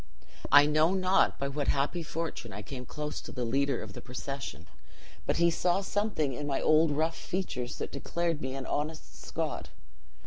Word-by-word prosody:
I 145 0 +9
know 155 +4 +4
not 185 0 +3
by 140 - -1
what 140 +1 -2
happy 145 +5 +1
fortune 160 -7 -4
I 105 +2 -6
came 125 0 -7
close 150 0 -4
to - - -9
the 125 -2 -2
leader 135 +1 +1
of 105 -2 -9
the - - -7
procession, 125 - -6 0.6
but - - +2
he 170 0 +5
saw 175 +3 +2
something 200 -8 0
in 145 +3 -4
my 135 -2 +1
old 155 +1 +5
rough 155 +3 +1
features 135 -9 -3
that - - -4
declared 170 -3 -1
me 130 0 -3
an 135 -1 -4
honest 155 +2 -3
Scot. - - -3
145 Hz, 180 wpm, -30 LUFS, 135-165 Hz, 0.6 s, I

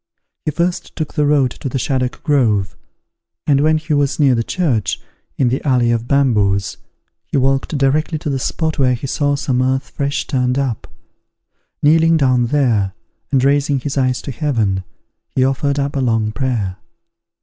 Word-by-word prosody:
He - - +1
first 170 +4 -2
took 155 -3 -4
the 150 -1 +1
road 140 -4 +3
to 135 - -6
the 135 - -2
Shaddock 130 0 -2
Grove, 115 - +1 0.7
and 140 -1 +3
when 155 +1 +3
he 155 0 -3
was 145 0 +1
near 140 -3 +5
the 115 -1 +1
church, 130 - -1 0.4
in 130 - +2
the 130 +4 -2
Alley 125 -4 +2
of 115 0 -1
Bamboos, 105 -9 +1 0.5
he - - -1
walked 135 +3 +1
directly 150 +4 +1
to 150 - -4
the 135 - -1
spot 160 +4 -2
where 130 -2 +3
he 120 - -6
saw 145 +1 0
some 130 -3 0
earth 130 +1 -1
fresh 140 0 -2
turned 125 -2 0
up; 135 -6 -2 1.0
kneeling 165 +2 +5
down 130 -4 +2
there, 115 -8 +1 0.4
and 135 -2 +2
raising 140 0 +2
his 140 +2 -4
eyes 130 -2 0
to 140 - -5
heaven, 110 -8 -1 0.5
he 130 - +3
offered 140 +1 0
up 140 0 -1
a 135 - 0
long 115 -3 +1
prayer. 110 -7 -2
135 Hz, 170 wpm, -18 LUFS, 125-145 Hz, 1.0 s, near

